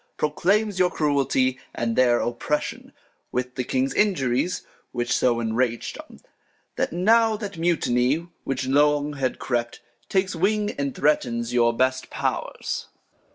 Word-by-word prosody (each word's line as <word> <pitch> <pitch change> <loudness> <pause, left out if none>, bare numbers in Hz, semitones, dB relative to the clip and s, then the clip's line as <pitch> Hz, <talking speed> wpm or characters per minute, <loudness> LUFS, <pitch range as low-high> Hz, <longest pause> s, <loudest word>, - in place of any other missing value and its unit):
Proclaims 195 +7 +1
your 180 -1 +4
Cruelty, 135 -4 +1 0.2
and 115 -1 -1
their 120 -2 +4
Oppression, 120 +5 -2 0.4
With 125 0 -2
the 125 - -2
King's 130 +2 0
Injuries; 175 - +1 0.3
which 120 -1 0
so 120 -2 +2
enrag'd 115 +1 -1
'em. - - -12 0.6
That - - -1
now 220 +5 +3
that 200 -5 -6
Mutiny, 155 -2 +1 0.2
which 135 -1 -2
long 145 +2 +3
had 135 -3 -2
crept, 120 -2 -2 0.3
Takes 190 -1 +1
Wing, 210 +4 +1
and 140 -2 -3
threatens 120 -5 +1
your 120 -1 +4
best 130 +2 0
Pow'rs. - - -3
135 Hz, 130 wpm, -24 LUFS, 125-175 Hz, 0.6 s, your